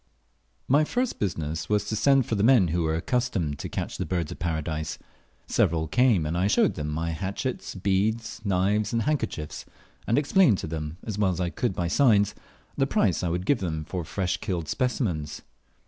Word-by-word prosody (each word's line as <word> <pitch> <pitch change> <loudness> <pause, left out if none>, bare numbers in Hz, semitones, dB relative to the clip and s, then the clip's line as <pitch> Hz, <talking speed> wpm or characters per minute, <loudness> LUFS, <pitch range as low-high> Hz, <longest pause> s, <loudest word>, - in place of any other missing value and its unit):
My 145 +4 +4
first 245 +9 -1
business 80 -5 -2
was 105 -1 +2
to 110 - -2
send 135 +3 +4
for 125 - -3
the 100 - +1
men 110 -6 +5
who 85 +2 0
were 80 -1 0
accustomed 90 - -1
to - - -5
catch - - -4
the 95 - -1
Birds 85 -2 -1
of - - -8
Paradise. 80 -2 -2 0.5
Several 80 -1 +1
came, 115 - +3
and 80 +3 -2
I 90 +3 +2
showed - - +3
them 75 - -4
my 80 +2 -2
hatchets, 100 - -4
beads, 105 +5 0
knives, 100 +2 +1
and 115 -1 +1
handkerchiefs; 135 - -2 0.4
and 115 - +2
explained 145 - +4
to - - -5
them, 80 0 -5
as 105 -2 -4
well 100 -2 +3
as 85 - -4
I 90 -2 -1
could 120 -3 -1
by 85 - -1
signs, 105 -1 +4 0.4
the - - +1
price - - +2
I 90 - -1
would 90 +2 -2
give 120 -5 +2 0.2
for 90 -2 -3
fresh 90 +2 -2
killed 85 -6 -3
specimens. 95 - -2
95 Hz, 190 wpm, -26 LUFS, 80-115 Hz, 0.5 s, men